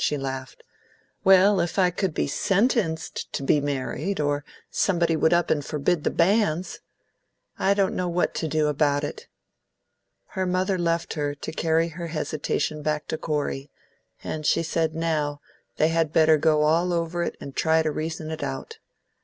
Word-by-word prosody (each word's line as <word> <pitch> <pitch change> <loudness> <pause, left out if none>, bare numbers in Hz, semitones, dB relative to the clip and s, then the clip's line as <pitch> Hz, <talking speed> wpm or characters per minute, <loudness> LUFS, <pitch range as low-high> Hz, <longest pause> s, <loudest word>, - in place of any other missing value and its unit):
She 150 - +1
laughed. 135 -1 -6 0.6
"Well, 190 +1 +6
if 170 +1 -1
I 180 -2 +4
could 180 -2 -2
be - - +1
SENTENCED 195 - 0
to 140 - -3
be 145 +2 +3
married, 145 +6 -2
or 145 -1 0 0.3
somebody 170 -4 +1
would 160 0 +2
up 175 0 +2
and 145 -2 +1
forbid 150 +3 0
the - - +2
banns! 185 -1 +1 0.8
I 200 +1 +3
don't 195 -1 +1
know 180 -1 -1
what 175 +1 0
to 160 - -2
do 155 0 +1
about 145 -1 +1
it." 145 - -6 1.0
Her 190 -2 -2
mother 185 +1 0
left 170 -1 0
her 145 -2 -2
to 145 - -6
carry 165 +1 +1
her 170 +1 -6
hesitation 155 -1 -2
back 150 0 -2
to 160 - -2
Corey, 145 -3 -2 0.5
and 155 - -4
she 165 - +2
said 160 -1 -1
now, 155 -3 -1 0.4
they 155 - +3
had 165 -2 +1
better 155 0 +5
go 150 0 +3
all 170 +4 +2
over 170 0 -1
it 170 - -3
and 140 - -9
try 160 0 +3
to 155 - 0
reason 160 +1 -4
it 160 - -5
out. 140 - -5
160 Hz, 170 wpm, -25 LUFS, 150-175 Hz, 1.0 s, Well